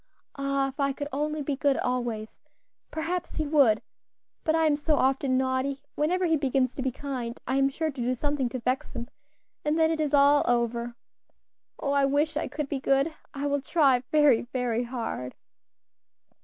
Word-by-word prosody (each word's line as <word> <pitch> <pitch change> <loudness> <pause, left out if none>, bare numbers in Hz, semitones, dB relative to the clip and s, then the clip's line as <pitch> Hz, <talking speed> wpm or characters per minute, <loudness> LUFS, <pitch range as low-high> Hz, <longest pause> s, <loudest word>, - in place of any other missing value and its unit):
"Ah! 275 -1 0
if 270 - -13
I 275 -1 +1
could 285 +1 -5
only 300 +1 -1
be 280 0 -1
good 280 0 +2
always, 240 -4 -3 0.5
perhaps 335 +3 -3
he 310 - -1
would; 280 -8 +4 0.6
but 315 -1 +2
I 325 0 +3
am 300 -2 +4
so 300 +1 +1
often 265 -1 +2
naughty; 265 +1 -1
whenever 360 +5 +1
he 325 -2 +3
begins 265 -3 +1
to - - -5
be 260 0 0
kind 250 -3 -5
I 260 +2 0
am 275 0 +3
sure 315 +3 -2
to 265 -3 -6
do 250 +2 0
something 285 -1 -1
to 255 - -4
vex 255 +3 -2
him, 240 -2 -6 0.5
and 300 +1 +1
then 320 0 +4
it 320 - -1
is 300 -2 +2
all 285 +1 +5
over. 235 0 0 0.8
Oh! 280 - -2
I 280 -1 +3
wish 290 +3 +1
I 300 - -1
could 300 -2 -4
be 280 -1 -2
good! 275 +4 +2 0.2
I 280 +1 -3
will 285 0 0
try 270 -3 +3
very, 295 -6 +5
very 245 -2 -1
hard. 230 - -4
275 Hz, 185 wpm, -27 LUFS, 255-295 Hz, 0.8 s, all